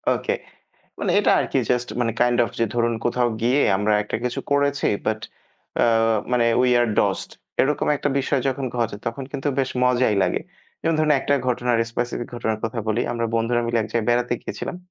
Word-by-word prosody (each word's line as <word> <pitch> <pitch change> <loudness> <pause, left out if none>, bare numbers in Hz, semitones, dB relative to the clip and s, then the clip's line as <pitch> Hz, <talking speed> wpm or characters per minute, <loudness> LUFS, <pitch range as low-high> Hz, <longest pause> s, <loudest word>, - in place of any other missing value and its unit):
ওকে - - -1 0.7
মানে - - -1
এটা - - +3
আরকি - - 0
জাস্ট 125 0 +1
মানে 115 -2 +1
কাইন্ড 120 0 +3
অফ 110 - -5
যে - - +4
ধরুন 120 -1 +1
কোথাও 120 0 +2
গিয়ে 130 +4 +3 0.2
আমরা 105 +2 +1
একটা 105 - -3
কিছু 125 - -2
করেছি 140 0 +2 0.2
বাট 110 0 0 0.6
আ - - +5 0.5
মানে 120 -1 +3
উই 125 0 +3
আর 120 - +3
ডসড - - +1 0.3
এরকম 150 +3 +1
একটা 145 - -1
বিষয় 140 0 0
যখন 135 +1 -2
ঘটে 115 -3 -1
তখন 115 +4 -3
কিন্তু 140 +2 -2
বেশ 130 -1 +1
মজাই 125 -4 +3
লাগে। 90 - 0 0.4
যেমন 165 - +1
ধরুন 155 -1 +3
একটা 145 - +1
ঘটনার 120 -1 +1
স্পেসিফিক 120 0 -3
ঘটনার 110 -2 -2
কথা 115 +1 -3
বলি, 110 +2 +1
আমরা 115 -1 -1
বন্ধুরা 115 +1 +1
মিলে 115 0 +1
এক - - -5
জায়গায় 115 -1 0
বেড়াতে 120 0 +1
গিয়েছিলাম। 185 - -5
120 Hz, 190 wpm, -23 LUFS, 115-130 Hz, 0.7 s, আ